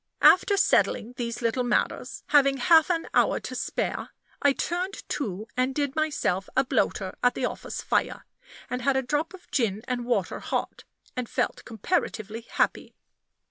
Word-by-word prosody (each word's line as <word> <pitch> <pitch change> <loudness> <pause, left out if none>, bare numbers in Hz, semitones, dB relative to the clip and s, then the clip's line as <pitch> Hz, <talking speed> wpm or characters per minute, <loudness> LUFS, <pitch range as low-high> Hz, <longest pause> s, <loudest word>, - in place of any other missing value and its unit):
After 400 +2 +6
settling 245 - +2
these 235 -1 -4
little 235 +2 +1
matters, 245 - -1
having 275 -2 +5
half 320 +6 +5
an 335 -2 0
hour - - +3
to - - -6
spare, - - -2 0.3
I 285 - +5
turned 355 +7 -3
to 215 -8 -3
and 255 +1 0
did 285 -2 -1
myself 285 - 0
a 265 - +5
bloater 195 -6 0
at 245 - +3
the - - -1
office - - -5
fire, - - 0 0.4
and 250 0 -3
had 270 +2 +2
a 265 - +1
drop 295 +7 -1
of 360 - -19
gin 220 -5 0
and 250 -1 -2
water 245 - 0
hot, - - -3 0.3
and 250 -2 -3
felt - - -1
comparatively 225 - -2
happy. - - -1
255 Hz, 160 wpm, -26 LUFS, 235-300 Hz, 0.4 s, After